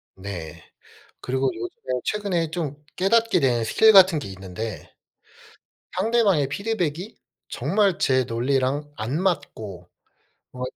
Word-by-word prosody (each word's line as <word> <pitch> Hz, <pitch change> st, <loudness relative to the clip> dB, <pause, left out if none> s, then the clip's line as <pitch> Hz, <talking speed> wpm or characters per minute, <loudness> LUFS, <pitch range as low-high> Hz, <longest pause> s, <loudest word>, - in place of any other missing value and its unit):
네. 95 Hz, -4 st, -8 dB, 0.6 s
그리고 130 Hz, +1 st, 0 dB
요즘에 125 Hz, +2 st, -5 dB
최근에 190 Hz, -6 st, -1 dB
좀 150 Hz, -3 st, -4 dB
깨닫게 225 Hz, +1 st, +3 dB
된 120 Hz, -4 st, +2 dB
스킬 220 Hz, -, +5 dB
같은 190 Hz, -5 st, +7 dB
게 140 Hz, -, -6 dB
있는데 95 Hz, +3 st, -7 dB, 1.1 s
상대방의 200 Hz, -, +3 dB
피드백이 190 Hz, 0 st, -3 dB, 0.3 s
정말 190 Hz, -, +1 dB
제 130 Hz, -5 st, +3 dB
논리랑 130 Hz, +4 st, -1 dB
안 130 Hz, +11 st, -2 dB
맞고 105 Hz, -, -3 dB, 0.7 s
어 125 Hz, 0 st, -8 dB
145 Hz, 230 characters per minute, -24 LUFS, 120-190 Hz, 1.1 s, 같은